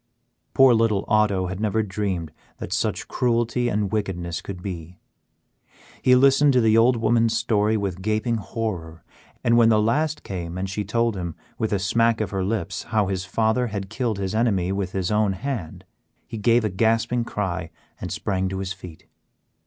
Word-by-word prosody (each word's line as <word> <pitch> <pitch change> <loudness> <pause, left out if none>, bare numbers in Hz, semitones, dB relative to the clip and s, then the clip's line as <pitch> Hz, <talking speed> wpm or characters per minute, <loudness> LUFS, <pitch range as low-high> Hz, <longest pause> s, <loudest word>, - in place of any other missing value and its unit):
Poor 135 -2 +7
little 110 -3 +2
Otto 105 -3 +2
had 95 +1 -5
never 110 +1 +1
dreamed 95 -5 -3 0.3
that - - -5
such - - -1
cruelty 120 0 0
and 105 -3 -1
wickedness 90 -5 -2
could 90 -1 -8
be. 90 -2 -7 1.0
He 125 - +5
listened 135 +2 +5
to 125 - +4
the 110 -2 +4
old 120 +2 +5
woman's 115 0 +2
story 110 -1 +1
with 95 -3 -3
gaping 110 +3 0
horror, 95 -7 -5 0.4
and 115 0 +4
when 115 -1 +6
the 110 -1 +4
last 150 +8 0
came 90 -2 -5
and 95 +1 -2
she 100 +2 -3
told 115 +2 0
him, 85 -4 -5 0.2
with 110 - -1
a 100 - +2
smack 115 +4 +2
of 110 -4 -2
her 95 -2 -1
lips, 105 +3 -2
how 105 -4 0
his 95 -1 -2
father 110 +6 +1
had 100 -2 -5
killed 115 -2 -1
his 95 0 -3
enemy 100 -5 +1
with 95 -1 -3
his 95 -1 -1
own 105 -2 +2
hand, 105 - -5 0.4
he 115 -2 -7
gave 115 +2 +3
a - - +1
gasping 115 +4 +1
cry 95 -7 -3 0.3
and - - -5
sprang 95 -1 -1
to 95 - -4
his 95 0 -3
feet. 90 -4 -12
105 Hz, 180 wpm, -23 LUFS, 95-115 Hz, 1.0 s, Poor